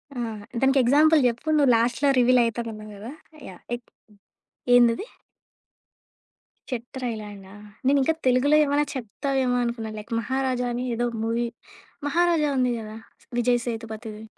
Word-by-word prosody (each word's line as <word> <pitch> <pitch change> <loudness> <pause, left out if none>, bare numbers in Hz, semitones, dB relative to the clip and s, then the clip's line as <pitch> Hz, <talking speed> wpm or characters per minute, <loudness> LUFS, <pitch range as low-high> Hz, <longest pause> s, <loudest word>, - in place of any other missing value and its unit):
ఆ! - - -4 0.4
దానికి 270 +1 +4
ఎగ్జాంపుల్ 300 +4 +5
జెప్పు, 240 +5 -4
నువ్వు 280 -4 +4
లాస్ట్‌లో 240 +5 +1
రివీల్ 250 0 +5
అయితానన్నావు 225 -2 -5
గదా! 220 +5 -8 0.4
యాహ్! 180 - -13 0.2
ఎక్ 240 - -26 0.9
ఏందది? 240 - +3 1.7
చెట్టర్ 250 +1 -6
ఐ - - -2
లాండా! 200 -2 -11 0.4
నేనింకా 280 +3 +3
తెలుగులో 255 +4 +4
ఏమైనా 290 0 +1
చెప్తావేమో 260 +1 -1
అనుకున్నాను. 225 -2 -4
లైక్ 215 +3 -12
'మహారాజా' 255 +1 -1
అని 245 +1 -3
ఏదో 240 +1 0 0.2
మూవీ 230 +1 0 0.6
మహారాజా 335 -1 +2
ఉంది 250 -1 +2
గదా! 215 0 -8 0.4
విజయ్ 245 0 +2
సేతుపతిది. 220 -2 -6
245 Hz, 125 wpm, -24 LUFS, 230-270 Hz, 1.7 s, ఎగ్జాంపుల్